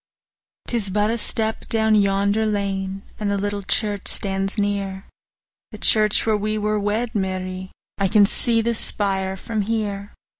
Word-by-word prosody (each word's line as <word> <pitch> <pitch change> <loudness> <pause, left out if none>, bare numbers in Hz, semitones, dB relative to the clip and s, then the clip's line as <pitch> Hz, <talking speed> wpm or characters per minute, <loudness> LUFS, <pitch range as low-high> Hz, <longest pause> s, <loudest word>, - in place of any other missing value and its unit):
'Tis 225 -5 -1
but 210 +2 +1
a 235 - 0
step 220 0 -2
down 220 -1 +3
yonder 200 +1 +3
lane, 195 -2 -2 0.2
And 210 -1 -1
the 200 - +1
little 205 0 -2
church 205 0 -1
stands 195 +1 -1
near, 200 -2 -1 0.6
The - - -9
church 215 -1 +3
where 220 -1 +3
we 215 +1 -1
were 210 0 0
wed, 215 +3 -1
Mary, 185 -1 -3 0.3
I 200 - +3 0.2
see 230 +3 +2
the 235 +1 0
spire 195 -3 +1
from 220 +2 -2
here. 205 -1 -2
205 Hz, 150 wpm, -22 LUFS, 195-215 Hz, 0.6 s, down